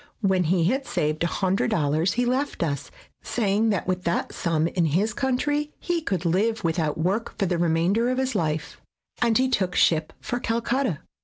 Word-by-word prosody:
When 190 Hz, -3 st, +2 dB
he 170 Hz, +1 st, +2 dB
had 265 Hz, +10 st, 0 dB
saved 150 Hz, +1 st, -1 dB
$100 170 Hz, -2 st, +1 dB
he 245 Hz, +1 st, +1 dB
left 260 Hz, -3 st, -1 dB
us, 140 Hz, -4 st, -3 dB, 0.3 s
saying 215 Hz, -1 st, +1 dB
that 200 Hz, -5 st, 0 dB
with 185 Hz, 0 st, -1 dB
that 170 Hz, -, -1 dB
sum 165 Hz, -2 st, 0 dB
in 170 Hz, 0 st, +1 dB
his 190 Hz, +8 st, +1 dB
country 290 Hz, +3 st, -1 dB
he 345 Hz, -2 st, -1 dB
could 190 Hz, -, -2 dB
live 205 Hz, +6 st, +1 dB
without 160 Hz, -2 st, 0 dB
work 200 Hz, +8 st, -1 dB
for 195 Hz, -, +1 dB
the 175 Hz, -2 st, 0 dB
remainder 175 Hz, +8 st, +2 dB
of 255 Hz, -, 0 dB
his 260 Hz, 0 st, 0 dB
life, 155 Hz, -5 st, -2 dB, 0.4 s
and 235 Hz, -2 st, +3 dB
he 260 Hz, +1 st, +3 dB
took 190 Hz, -8 st, 0 dB
ship 155 Hz, -2 st, +3 dB
for 245 Hz, -, -3 dB
Calcutta. 235 Hz, -, -1 dB
190 Hz, 175 wpm, -25 LUFS, 165-240 Hz, 0.4 s, and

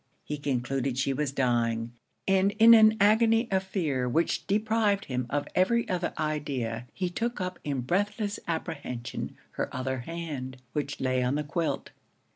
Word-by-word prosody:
He 150 Hz, -1 st, -4 dB
concluded 135 Hz, -1 st, -1 dB
she 135 Hz, 0 st, +1 dB
was 145 Hz, 0 st, -1 dB
dying; 120 Hz, -3 st, 0 dB, 0.4 s
and 195 Hz, +1 st, +3 dB
in 225 Hz, +2 st, +8 dB
an 220 Hz, -1 st, +7 dB
agony 225 Hz, +3 st, +4 dB
of 190 Hz, -1 st, +3 dB
fear, 155 Hz, -10 st, -1 dB
which 165 Hz, +7 st, 0 dB
deprived 215 Hz, -1 st, +1 dB
him 125 Hz, -2 st, -2 dB
of 145 Hz, +1 st, -1 dB
every 235 Hz, +6 st, +2 dB
other 180 Hz, -2 st, -1 dB
idea, 135 Hz, -7 st, -2 dB
he 185 Hz, -, -2 dB
took 235 Hz, +7 st, -2 dB
up 185 Hz, -1 st, -3 dB
in 140 Hz, -3 st, -2 dB
breathless 205 Hz, -, -1 dB
apprehension 140 Hz, -7 st, -4 dB
her -, -, -3 dB
other 130 Hz, 0 st, -2 dB
hand, 140 Hz, -3 st, -5 dB, 0.2 s
which 145 Hz, -1 st, -3 dB
lay 130 Hz, -1 st, +1 dB
on 125 Hz, +2 st, +1 dB
the 150 Hz, -, -1 dB
quilt. 160 Hz, +3 st, -2 dB
150 Hz, 155 wpm, -28 LUFS, 130-195 Hz, 0.4 s, in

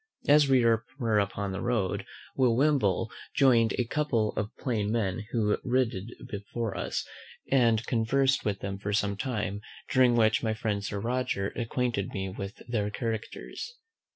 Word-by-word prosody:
As 145 Hz, -1 st, +6 dB
we 130 Hz, -3 st, +5 dB
were 115 Hz, 0 st, +1 dB
upon 100 Hz, 0 st, -1 dB
the 95 Hz, -, -4 dB
road, 110 Hz, -7 st, -1 dB, 0.3 s
Will 125 Hz, -3 st, +3 dB
Wimble 120 Hz, -7 st, +2 dB, 0.2 s
join'd 120 Hz, -5 st, +4 dB
a 125 Hz, -, +1 dB
couple 115 Hz, -5 st, 0 dB
of 105 Hz, 0 st, -1 dB
plain 110 Hz, -5 st, -1 dB
men 105 Hz, -2 st, -1 dB
who 105 Hz, -3 st, +1 dB
rid 125 Hz, -2 st, +2 dB, 0.3 s
before 105 Hz, +1 st, -4 dB
us, -, -, -2 dB, 0.5 s
and 115 Hz, -4 st, +4 dB
conversed 135 Hz, +4 st, +2 dB
with 100 Hz, -2 st, -2 dB
them 95 Hz, 0 st, -4 dB
for 100 Hz, 0 st, -3 dB
some 100 Hz, -1 st, +1 dB
time; 105 Hz, -3 st, -3 dB, 0.3 s
during 125 Hz, -2 st, +5 dB
which 110 Hz, -2 st, +3 dB
my 110 Hz, -2 st, 0 dB
friend 105 Hz, -2 st, -2 dB
Sir 100 Hz, 0 st, -3 dB
Roger 115 Hz, -3 st, -1 dB
acquainted 120 Hz, -3 st, -2 dB
me 95 Hz, -1 st, -2 dB
with 100 Hz, +1 st, -7 dB
their 105 Hz, -4 st, 0 dB
characters. 115 Hz, -, -5 dB
115 Hz, 155 wpm, -29 LUFS, 100-125 Hz, 0.5 s, As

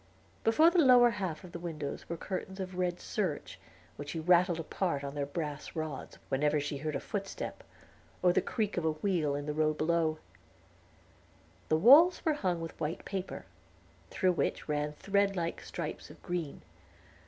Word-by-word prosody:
Before 310 Hz, +10 st, +5 dB
the 355 Hz, -, +3 dB
lower 250 Hz, -5 st, +7 dB
half 185 Hz, -8 st, -4 dB
of 180 Hz, -, -11 dB
the 170 Hz, -, -6 dB
windows 160 Hz, -4 st, -5 dB
were 170 Hz, -, -3 dB
curtains 190 Hz, +2 st, -5 dB
of 185 Hz, -1 st, -5 dB
red 180 Hz, -1 st, 0 dB
serge, 185 Hz, -9 st, -3 dB, 0.4 s
which 145 Hz, 0 st, -7 dB
she 165 Hz, -, -3 dB
rattled 175 Hz, +1 st, +4 dB
apart 165 Hz, -2 st, -2 dB
on 140 Hz, 0 st, -5 dB
their 145 Hz, -1 st, -2 dB
brass 150 Hz, 0 st, -5 dB
rods, 155 Hz, -4 st, -5 dB
whenever 150 Hz, +2 st, +2 dB
she 145 Hz, 0 st, -3 dB
heard 155 Hz, +1 st, -3 dB
a -, -, 0 dB
footstep, 195 Hz, +4 st, -5 dB, 0.6 s
or 180 Hz, -1 st, +5 dB
the -, -, +3 dB
creak 215 Hz, -5 st, -2 dB
of 175 Hz, -, 0 dB
a 160 Hz, -, +2 dB
wheel 155 Hz, -3 st, 0 dB
in 145 Hz, 0 st, -4 dB
the 150 Hz, -, -2 dB
road 155 Hz, 0 st, +1 dB
below. 160 Hz, 0 st, +1 dB, 1.5 s
The 155 Hz, -, +4 dB
walls 295 Hz, -, +7 dB
were 315 Hz, -, +3 dB
hung 185 Hz, -, -1 dB
with 165 Hz, -, -7 dB
white 155 Hz, +2 st, -3 dB
paper, 190 Hz, -2 st, -5 dB, 0.6 s
through 185 Hz, -, +2 dB
which 175 Hz, -, -1 dB
ran 150 Hz, 0 st, -1 dB
thread 200 Hz, +4 st, +1 dB
like 170 Hz, -2 st, -2 dB
stripes -, -, -6 dB
of -, -, -13 dB
green. 175 Hz, -5 st, -4 dB
170 Hz, 175 wpm, -31 LUFS, 150-195 Hz, 1.5 s, lower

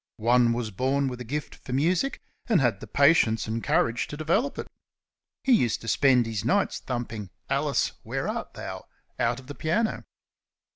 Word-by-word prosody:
One 120 Hz, +1 st, +4 dB
was 115 Hz, -2 st, -3 dB
born 135 Hz, +6 st, 0 dB
with 125 Hz, -1 st, -7 dB
a -, -, -3 dB
gift 145 Hz, +6 st, -4 dB
for 125 Hz, -, -8 dB
music, 175 Hz, -, +1 dB, 0.3 s
and 215 Hz, -, +5 dB
had 120 Hz, -7 st, +1 dB
the -, -, -9 dB
patience 140 Hz, -6 st, +4 dB
and 110 Hz, +1 st, -3 dB
courage 115 Hz, +1 st, +1 dB
to 145 Hz, -, -7 dB
develop 185 Hz, -, 0 dB
it. -, -, -4 dB, 0.8 s
He 270 Hz, -, +2 dB
used 125 Hz, -, +3 dB
to 115 Hz, -, -9 dB
spend 130 Hz, -2 st, +4 dB
his 110 Hz, -3 st, -3 dB
nights 200 Hz, 0 st, +1 dB
thumping 115 Hz, -5 st, -5 dB, 0.2 s
"Alice, -, -, +1 dB
where -, -, -3 dB
art -, -, -4 dB
thou?" -, -, -7 dB, 0.3 s
out 120 Hz, +1 st, +1 dB
of 130 Hz, -, -14 dB
the 145 Hz, -, -7 dB
piano. 215 Hz, +10 st, -1 dB
125 Hz, 180 wpm, -26 LUFS, 115-155 Hz, 0.8 s, and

